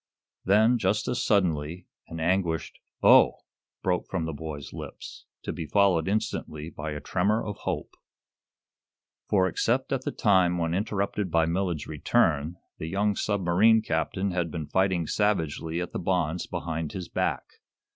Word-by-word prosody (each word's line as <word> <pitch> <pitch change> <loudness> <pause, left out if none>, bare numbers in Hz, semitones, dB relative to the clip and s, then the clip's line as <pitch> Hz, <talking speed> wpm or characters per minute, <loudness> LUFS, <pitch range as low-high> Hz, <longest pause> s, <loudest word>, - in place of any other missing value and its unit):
Then, 110 +5 +4
just 100 +1 0
as 125 -1 -1
suddenly, 85 -4 0 0.2
an 80 - -7
anguished 85 -1 0 0.2
"oh!" - - +6 0.4
broke 90 -1 0
from 90 -4 -2
the 80 - -3
boy's 75 -2 -7
lips, - - -9 0.2
to - - -3
be 80 - -5
followed, 95 -1 +3
instantly, 85 -6 -2
by 80 0 -5
a 75 - -5
tremor 100 +8 0
of 105 - -5
hope. - - -4 1.4
For, 95 -2 +3
except 130 +8 0
at 135 - 0
the - - -2
time 95 -4 +3
when 85 -1 -1
interrupted 100 0 -1
by 80 0 +3
Millard's 85 -2 -1
return, 75 +1 +1 0.2
the 80 - -4
young 100 +4 +1
submarine 100 +3 +3
captain 95 +3 -1
had 90 -2 -1
been 80 -1 -4
fighting 95 0 +1
savagely 80 -5 0
at 90 -1 -4
the - - -3
bonds 90 -2 -1
behind 80 -2 -4
his 90 -3 -5
back. - - -1
90 Hz, 150 wpm, -27 LUFS, 80-100 Hz, 1.4 s, oh